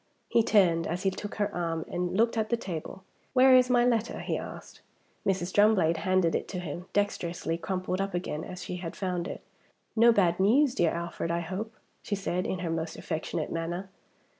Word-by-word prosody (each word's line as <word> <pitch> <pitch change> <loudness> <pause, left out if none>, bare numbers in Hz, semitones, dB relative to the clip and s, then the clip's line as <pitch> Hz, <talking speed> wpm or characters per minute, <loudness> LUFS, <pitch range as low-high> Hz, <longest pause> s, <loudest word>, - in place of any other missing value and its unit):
He 230 - +4
turned, 180 -7 +3
as 175 +3 -3
he 195 - +2
took 205 +2 -6
her 205 -1 -1
arm, 165 -2 -2
and 180 +1 -2
looked 230 +2 +3
at 220 -1 0
the 235 - +2
table. 185 -2 -6 0.3
"Where 260 0 +7
is 255 0 +5
my 245 -1 +4
letter?" 235 -2 +1
he - - -2
asked. - - -8 0.5
Mrs. 185 -2 0
Drumblade 200 -6 +4
handed 185 -3 +2
it - - -1
to 185 - -4
him, 175 +1 -6
dexterously 175 -5 -1
crumpled 185 +2 -2
up 195 -1 -2
again 160 -3 -3
as 180 0 -7
she 180 - -5
had 170 -2 -6
found 180 -2 -2
it. - - -6 0.5
"No 235 +1 +7
bad 180 -5 +2
news, 250 +8 +4
dear 170 -7 +2
Alfred, 170 0 -3
I 170 0 0
hope?" 195 +6 -5 0.3
she 205 - -2
said, 185 -2 -2
in 190 - -1
her 165 - -1
most 165 0 -3
affectionate 160 - -3
manner. 175 +3 -3
185 Hz, 195 wpm, -29 LUFS, 170-210 Hz, 0.5 s, Where